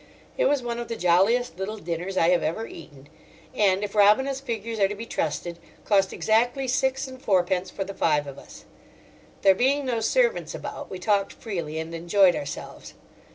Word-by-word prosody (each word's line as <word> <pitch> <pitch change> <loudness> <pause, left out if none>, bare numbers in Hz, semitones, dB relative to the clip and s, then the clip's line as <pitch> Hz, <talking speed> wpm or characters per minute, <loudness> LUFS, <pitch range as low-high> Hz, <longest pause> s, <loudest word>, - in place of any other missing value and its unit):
It - - +1
was 290 - +2
one 235 0 -3
of 240 - -5
the 230 - -4
jolliest 190 +3 +2
little 210 +3 -4
dinners 175 +1 -4
I 165 - +4
have 180 -1 +3
ever 165 +9 -2
eaten; 145 -7 -12 0.5
and, 195 -1 +2
if 205 - -4
Robina's 215 +7 +4
figures 230 -4 -4
are 195 - +4
to 205 - -5
be 225 +3 -7
trusted, 170 -1 -3 0.3
cost 195 -2 +3
exactly 245 +5 +1
six 265 +2 0
and 260 -1 -11
fourpence 185 -3 +1
for 195 - -4
the 195 +1 -7
five 150 -5 +1
of 140 -1 -9
us. - - -14 0.8
There 195 -1 +7
being 270 +7 +1
no 240 -3 -1
servants 480 - +1
about, - - -7
we 190 - -6
talked 200 +1 0
freely 170 -8 -5
and 160 +1 -5
enjoyed 175 +2 +3
ourselves. 140 - -7
200 Hz, 185 wpm, -25 LUFS, 175-240 Hz, 0.8 s, There